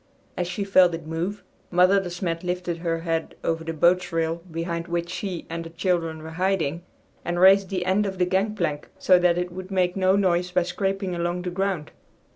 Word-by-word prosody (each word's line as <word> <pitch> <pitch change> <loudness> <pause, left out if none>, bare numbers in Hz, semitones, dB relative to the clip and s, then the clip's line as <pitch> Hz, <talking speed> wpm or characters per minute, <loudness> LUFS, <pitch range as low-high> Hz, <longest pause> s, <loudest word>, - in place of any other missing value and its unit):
As 180 - -2
she 180 +3 -3
felt 185 -3 +5
it 165 -1 -9
move, 170 +6 -3 0.3
Mother 180 +3 +5
De 190 -2 -4
Smet 175 -1 -3
lifted 180 -1 -2
her 165 -1 -2
head 165 -1 -2
over 165 0 -1
the 165 - -3
boat's 175 +3 +2
rail 165 0 0
behind 170 +1 -3
which 170 0 -2
she 185 -2 -4
and 165 0 -4
the 165 - -8
children 165 -2 -1
were 160 - -7
hiding, 170 -3 0 0.4
and 175 0 -2
raised 190 +1 +6
the 185 -2 -2
end 195 +3 +2
of 190 -1 -5
the 180 - +2
gangplank 190 -5 -1
so 185 -1 +5
that 175 -1 +3
it 180 0 -2
would 185 +1 -8
make 185 -2 +1
no 190 0 +3
noise 180 -2 +2
by 180 0 +2
scraping 195 +1 -2
along 175 +1 -2
the 180 - -3
ground. 190 -4 -2
180 Hz, 205 wpm, -25 LUFS, 165-185 Hz, 0.4 s, raised